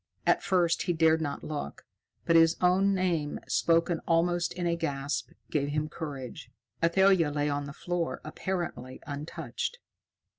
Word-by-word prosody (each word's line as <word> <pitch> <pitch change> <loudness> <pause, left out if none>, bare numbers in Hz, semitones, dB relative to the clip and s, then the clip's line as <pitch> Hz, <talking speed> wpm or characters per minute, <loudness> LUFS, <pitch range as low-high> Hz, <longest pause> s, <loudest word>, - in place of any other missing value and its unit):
At - - +3
first, 175 -3 +2
he 175 - 0
dared 160 0 +4
not 145 -2 -3
look, 145 - -5 0.4
but 165 - +3
his 165 0 +6
own 190 +2 +3
name, 170 -6 0
spoken 165 0 +2
almost 175 +1 +2
in 180 -1 -3
a 170 0 +2
gasp, 140 -6 -2 0.2
gave 145 -2 +1
him 150 +1 -1
courage. 140 -6 -7 0.3
Athalia 185 -1 +4
lay 145 0 0
on 145 0 -2
the 140 - -7
floor, 175 +1 -2
apparently 155 -7 -4
untouched. 150 - -4
165 Hz, 145 wpm, -29 LUFS, 145-175 Hz, 0.4 s, his